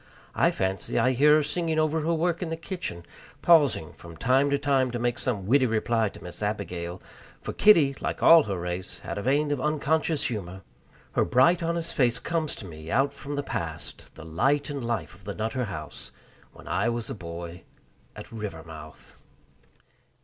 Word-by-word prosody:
I -, -, +3 dB
fancy 95 Hz, +1 st, -2 dB
I 130 Hz, -, +3 dB
hear 145 Hz, +4 st, +5 dB
her 155 Hz, -, +3 dB
singing 165 Hz, +1 st, -1 dB
over 155 Hz, 0 st, +1 dB
her 165 Hz, +2 st, 0 dB
work 170 Hz, +2 st, 0 dB
in 175 Hz, -, -2 dB
the 165 Hz, -, -3 dB
kitchen, 165 Hz, -, -6 dB, 0.4 s
pausing 145 Hz, -, +4 dB
from 85 Hz, -1 st, -12 dB
time 135 Hz, +3 st, +3 dB
to 140 Hz, -, +2 dB
time 135 Hz, -2 st, +2 dB
to 120 Hz, -, -3 dB
make 120 Hz, +1 st, -1 dB
some 110 Hz, -8 st, -2 dB
witty 130 Hz, +4 st, +4 dB
reply 115 Hz, 0 st, +1 dB
to -, -, -13 dB
Miss 90 Hz, +3 st, -8 dB
Abigail 90 Hz, -4 st, -3 dB, 0.4 s
for -, -, -6 dB
Kitty, 165 Hz, -10 st, +5 dB
like -, -, -3 dB
all 165 Hz, -1 st, +9 dB
her 100 Hz, -3 st, -3 dB
race, 90 Hz, +1 st, -4 dB
had -, -, -5 dB
a -, -, -3 dB
vein 145 Hz, +5 st, +1 dB
of 145 Hz, -3 st, -1 dB
unconscious 155 Hz, +1 st, 0 dB
humor. 95 Hz, -4 st, -4 dB, 0.5 s
Her -, -, +2 dB
bright 170 Hz, +8 st, +4 dB
honest 170 Hz, 0 st, -2 dB
face 120 Hz, -4 st, +2 dB
comes 160 Hz, +3 st, -1 dB
to -, -, -8 dB
me 80 Hz, -2 st, -10 dB
out 135 Hz, +6 st, +2 dB
from 145 Hz, 0 st, -6 dB
the 145 Hz, -, -2 dB
past, -, -, -6 dB
the 80 Hz, -, -11 dB
light 140 Hz, -, +1 dB
and 140 Hz, -3 st, -4 dB
life 115 Hz, -9 st, -2 dB
of 90 Hz, +3 st, -18 dB
the 100 Hz, 0 st, -5 dB
Nutter 115 Hz, +3 st, -2 dB
House 80 Hz, -7 st, -7 dB, 0.4 s
when -, -, -15 dB
I 120 Hz, -, +1 dB
was 120 Hz, +1 st, -3 dB
a -, -, -2 dB
boy 85 Hz, -3 st, -8 dB, 0.5 s
at -, -, -10 dB
Rivermouth. 80 Hz, -8 st, -9 dB
125 Hz, 185 wpm, -27 LUFS, 95-150 Hz, 0.5 s, all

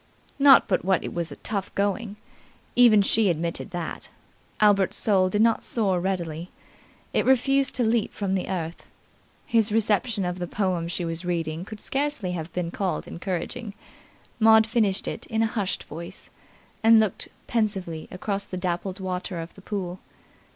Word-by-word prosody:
Not 275 Hz, -1 st, +7 dB
but 190 Hz, -, +1 dB
what 190 Hz, -1 st, +2 dB
it -, -, -5 dB
was 170 Hz, -1 st, -3 dB
tough 200 Hz, -3 st, -3 dB
going. 200 Hz, +1 st, -1 dB, 0.6 s
Even 230 Hz, -4 st, +7 dB
she 210 Hz, 0 st, +3 dB
admitted 170 Hz, +3 st, -2 dB
that. 175 Hz, -3 st, -5 dB, 0.5 s
Albert's 205 Hz, -3 st, +4 dB
soul 190 Hz, -3 st, +3 dB
did 210 Hz, +3 st, +2 dB
not 230 Hz, -1 st, +2 dB
soar 195 Hz, -6 st, 0 dB
readily. 175 Hz, -3 st, -3 dB, 0.6 s
It -, -, +2 dB
refused 270 Hz, +2 st, +3 dB
to 250 Hz, -, +1 dB
leap 225 Hz, -1 st, +1 dB
from 195 Hz, -2 st, -2 dB
the 190 Hz, -, -1 dB
earth. 170 Hz, -3 st, -4 dB, 0.6 s
His 225 Hz, -2 st, +2 dB
reception 215 Hz, -1 st, +1 dB
of 180 Hz, +1 st, -3 dB
the 175 Hz, -, -3 dB
poem 185 Hz, -3 st, -1 dB
she 170 Hz, +1 st, -3 dB
was 165 Hz, +1 st, -2 dB
reading 165 Hz, -1 st, -2 dB
could 215 Hz, +1 st, -9 dB
scarcely 275 Hz, -9 st, -2 dB
have 165 Hz, -2 st, -5 dB
been 175 Hz, -1 st, -3 dB
called 190 Hz, -1 st, -2 dB
encouraging. 195 Hz, +5 st, -4 dB, 0.6 s
Maud 220 Hz, 0 st, +7 dB
finished 215 Hz, -3 st, +1 dB
it -, -, -5 dB
in 225 Hz, 0 st, +1 dB
a 220 Hz, -, -1 dB
hushed 205 Hz, -5 st, -2 dB
voice, 170 Hz, +4 st, -9 dB, 0.5 s
and 225 Hz, 0 st, +7 dB
looked 215 Hz, -4 st, 0 dB, 0.2 s
pensively 195 Hz, -8 st, -2 dB
across 200 Hz, +2 st, -3 dB
the 185 Hz, -, -7 dB
dappled 180 Hz, +2 st, -3 dB
water 185 Hz, -1 st, -4 dB
of 165 Hz, +1 st, -7 dB
the 195 Hz, -, -15 dB
pool. 185 Hz, -3 st, -4 dB
195 Hz, 160 wpm, -25 LUFS, 175-220 Hz, 0.6 s, Not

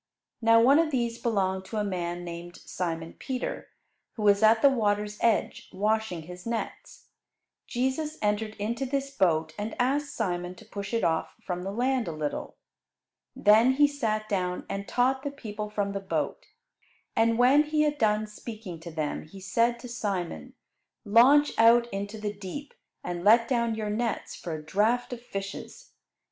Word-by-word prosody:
Now 230 Hz, 0 st, +6 dB
one 270 Hz, +6 st, +6 dB
of 330 Hz, -1 st, +2 dB
these 235 Hz, -4 st, -1 dB
belonged 190 Hz, -4 st, 0 dB
to 220 Hz, -, -5 dB
a 210 Hz, -, +1 dB
man 175 Hz, -3 st, -3 dB
named 175 Hz, 0 st, -8 dB
Simon 165 Hz, -2 st, -4 dB
Peter, 260 Hz, -2 st, -4 dB, 0.5 s
who 220 Hz, -, -5 dB
was 205 Hz, 0 st, +5 dB
at 220 Hz, +1 st, +5 dB
the 280 Hz, -, +9 dB
water's 210 Hz, -3 st, 0 dB
edge 230 Hz, -3 st, +1 dB
washing 210 Hz, -3 st, -1 dB
his 180 Hz, +2 st, -10 dB
nets. 230 Hz, -1 st, -5 dB, 0.6 s
Jesus 265 Hz, +5 st, -1 dB
entered 215 Hz, +1 st, -1 dB
into 230 Hz, +5 st, -2 dB
this 275 Hz, +1 st, -2 dB
boat 160 Hz, -, +1 dB
and 215 Hz, +2 st, -4 dB
asked 280 Hz, +3 st, +1 dB
Simon 180 Hz, -4 st, -2 dB
to -, -, -15 dB
push 200 Hz, -1 st, -6 dB
it 230 Hz, -1 st, 0 dB
off 160 Hz, -1 st, 0 dB
from 180 Hz, -1 st, -3 dB
the 190 Hz, +2 st, -4 dB
land 250 Hz, +3 st, 0 dB
a -, -, -2 dB
little. 150 Hz, -1 st, -4 dB, 0.8 s
Then 220 Hz, +5 st, +5 dB
He 290 Hz, +2 st, +5 dB
sat 220 Hz, -7 st, -2 dB
down 180 Hz, -4 st, -2 dB
and 195 Hz, 0 st, -4 dB
taught 260 Hz, +2 st, +2 dB
the 285 Hz, -, -3 dB
people 210 Hz, -6 st, -6 dB
from 205 Hz, -1 st, -1 dB
the 200 Hz, -, -3 dB
boat. 195 Hz, -, -3 dB, 0.7 s
And 225 Hz, 0 st, +3 dB
when 265 Hz, +5 st, +5 dB
He 305 Hz, 0 st, +2 dB
had 295 Hz, -1 st, 0 dB
done 215 Hz, -1 st, +2 dB
speaking 210 Hz, -4 st, -8 dB
to 165 Hz, +1 st, -8 dB
them 155 Hz, -1 st, -3 dB
He 195 Hz, +5 st, -12 dB
said 230 Hz, +5 st, +1 dB
to 250 Hz, -, -8 dB
Simon, 190 Hz, -, -4 dB, 0.5 s
"Launch 260 Hz, +8 st, +6 dB
out 235 Hz, +1 st, +7 dB
into 200 Hz, +2 st, -4 dB
the 210 Hz, -1 st, -3 dB
deep, 205 Hz, +9 st, -8 dB, 0.3 s
and 175 Hz, -1 st, -4 dB
let 230 Hz, +3 st, +6 dB
down 235 Hz, -3 st, +1 dB
your 215 Hz, -1 st, -3 dB
nets 230 Hz, +2 st, -2 dB
for 165 Hz, -2 st, -5 dB
a 155 Hz, -, -7 dB
draught 225 Hz, +8 st, +1 dB
of 240 Hz, -, -7 dB
fishes." 200 Hz, -, -7 dB
215 Hz, 170 wpm, -28 LUFS, 190-245 Hz, 0.8 s, the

